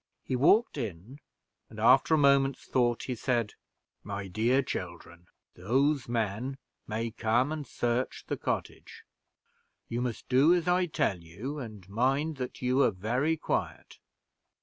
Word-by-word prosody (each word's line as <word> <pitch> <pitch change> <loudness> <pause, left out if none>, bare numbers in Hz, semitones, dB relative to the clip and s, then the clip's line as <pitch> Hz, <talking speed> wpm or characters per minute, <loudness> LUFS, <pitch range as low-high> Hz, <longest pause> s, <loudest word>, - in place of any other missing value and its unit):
He 130 - -2
walked 155 - +3
in, 110 - -6 0.5
and, 110 - -11
after 130 +7 +5
a - - +2
moment's 140 -2 +3
thought, 120 -2 +1
he 130 - -3
said, 120 -3 -1 0.5
"My 100 -1 -5
dear 120 +8 +2
children, 85 -4 -7 0.3
those 135 +7 +1
men 115 +3 -2 0.3
may 115 +1 -3
come 120 +5 +1
and 155 -4 -4
search 120 +2 -2
the - - -2
cottage; - - -5 0.9
you 120 +1 -2
must 125 -3 -4
do 140 +7 +5
as 175 -1 -1
I 180 0 +3
tell 95 - 0
you, 105 - -6
and 105 -7 -9
mind 135 +8 0
that 125 0 -6
you 130 +2 +2
are - - +5
very 125 - -1
quiet. - - -3
125 Hz, 145 wpm, -29 LUFS, 110-140 Hz, 0.9 s, after